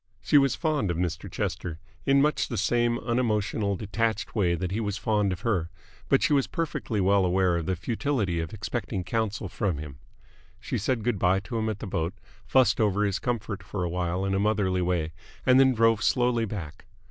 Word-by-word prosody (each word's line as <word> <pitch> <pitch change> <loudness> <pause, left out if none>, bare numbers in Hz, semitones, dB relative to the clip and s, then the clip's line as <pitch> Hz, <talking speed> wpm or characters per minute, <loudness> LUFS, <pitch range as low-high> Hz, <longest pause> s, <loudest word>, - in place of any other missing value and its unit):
She 145 - +4
was 135 -1 +2
fond 150 - 0
of 85 - -1
Mr. 90 -2 -3
Chester 80 -2 -3 0.3
in 140 0 +5
much 150 +1 +1
the 115 - -4
same 120 +1 +2
unemotional, 110 -4 0
detached 110 +2 -2
way 90 -6 +2
that 90 +2 -3
he 105 - -1
was 105 -2 -2
fond 105 -3 +1
of 90 - -4
her, 90 -8 0 0.4
but - - +4
she - - +3
was 140 -2 +3
perfectly 155 - -2
well 100 +1 +3
aware 90 0 +2
of 80 - -4
the 95 - +1
futility 110 - -1
of 80 -2 -4
expecting 95 - -3
counsel 105 +1 -2
from 95 -3 -1
him. 70 -3 -8 0.6
She - - -3
said 115 +2 -1
good 115 -4 0
bye 90 +2 +3
to 115 +3 -4
him 110 0 0
at 110 - -3
the 110 - -7
boat, 85 -1 -2 0.3
fussed 120 -2 +4
over 105 -1 +2
his 100 -2 -1
comfort 110 -4 -3
for 95 -3 -4
awhile 90 +2 -1
in 95 - 0
a 95 - +1
motherly 100 -3 +1
way, 85 -3 0 0.3
and 130 0 +6
then 130 -1 +5
drove 115 -1 +3
slowly 120 -2 +2
back. 95 -8 -7
105 Hz, 200 wpm, -27 LUFS, 90-115 Hz, 0.6 s, and